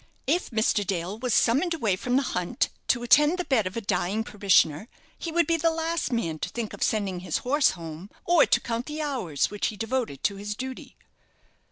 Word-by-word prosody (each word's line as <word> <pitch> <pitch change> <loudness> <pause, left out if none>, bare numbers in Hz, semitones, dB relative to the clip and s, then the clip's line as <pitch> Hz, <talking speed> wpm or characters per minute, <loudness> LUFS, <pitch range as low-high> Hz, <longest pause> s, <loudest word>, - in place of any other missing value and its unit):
If 340 +6 0
Mr. 220 -2 +1
Dale 190 +2 -3
was 250 0 -2
summoned 290 +11 +3
away 220 - +1
from 245 +6 -2
the 275 - +3
hunt 180 -1 -1 0.2
to 240 -1 +1
attend 295 +7 +5
the 360 - -2
bed 225 -8 +2
of 185 - -6
a - - -2
dying 195 +1 -1
parishioner, 195 - +2 0.3
he 335 - -5
would 340 +1 +3
be 330 +2 +1
the 330 +1 +2
last 325 -1 -2
man 165 -10 -1
to - - -3
think 235 -3 -5
of - - -10
sending 200 -4 0
his 180 - -2
horse 285 +3 +4
home, 165 +3 -8 0.2
or 345 -2 +5
to - - +3
count 235 +1 -4
the 305 +1 -4
hours 240 - -1
which 205 - -1
he 215 - -5
devoted 225 - -2
to 200 - 0
his 210 +1 -4
duty." 260 +2 -7
230 Hz, 210 wpm, -26 LUFS, 195-290 Hz, 0.3 s, attend